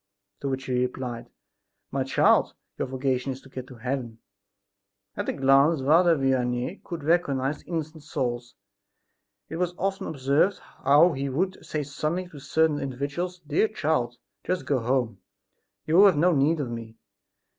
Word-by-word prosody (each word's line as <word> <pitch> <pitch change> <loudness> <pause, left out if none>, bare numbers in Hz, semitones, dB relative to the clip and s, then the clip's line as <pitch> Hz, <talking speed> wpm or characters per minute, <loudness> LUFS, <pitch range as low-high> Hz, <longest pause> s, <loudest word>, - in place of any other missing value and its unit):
To 140 - -3
which 135 0 -3
he 130 - -2
replied: 125 -2 -4 0.6
"My 135 0 0
child, 130 - +3 0.2
your - - -1
vocation 130 0 -1
is 130 - -12
to 135 - -16
get 130 -1 -7
to 130 - -11
heaven." 125 -1 -4 1.0
At - - -3
a - - 0
glance 135 +3 +4
Father 165 +4 +5
Vianney 130 +4 0
could 170 -4 -6
recognize 145 -4 +1
innocent 160 -2 -4
souls. 120 -4 -3 0.9
It 160 - -6
was 180 0 -1
often 195 0 -2
observed 140 +6 +1
how 145 +6 +3
he 140 -1 -3
would 185 +8 -2
say 155 -1 -3
suddenly 155 +6 -3
to 150 - -11
certain 150 +1 +1
individuals: 140 +7 -4
"Dear 155 +9 +2
child, 150 - -1 0.3
just 185 0 -2
go 140 -3 +1
home; 120 -3 0 0.7
you 170 +5 +6
have 190 -6 +5
no 175 +4 +4
need 155 +2 +2
of 125 -4 -4
me." 115 -1 -7
140 Hz, 155 wpm, -26 LUFS, 130-160 Hz, 1.0 s, you